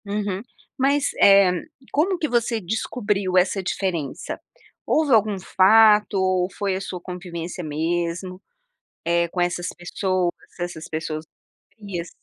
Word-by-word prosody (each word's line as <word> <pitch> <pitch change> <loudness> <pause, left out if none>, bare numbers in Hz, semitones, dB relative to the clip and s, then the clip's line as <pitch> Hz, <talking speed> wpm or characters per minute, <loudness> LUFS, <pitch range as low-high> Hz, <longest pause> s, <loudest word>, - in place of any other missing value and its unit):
Uhum, 200 -1 -2 0.4
mas, 280 +2 +2
eh, 195 -2 +7 0.4
como 360 +6 +2
que 315 - -1
você 235 -2 +1
descobriu 205 -1 -1
essa 190 +2 +3
diferença? 180 -6 -3 0.5
Houve 305 -4 +2
algum 215 -2 +3
fato 210 +3 +5
ou 185 -1 +1
foi 195 -2 0
a 190 - -3
sua 185 -2 -5
convivência 175 -1 -6
mesmo, 170 +4 -2 0.6
eh, 170 +1 +2
com 180 - -2
essas 175 0 -1
pessoas, 180 0 -1 0.3
essas 175 -2 -5
pessoas 155 0 -4 0.5
frias, 190 -6 -6
185 Hz, 125 wpm, -23 LUFS, 175-210 Hz, 0.6 s, eh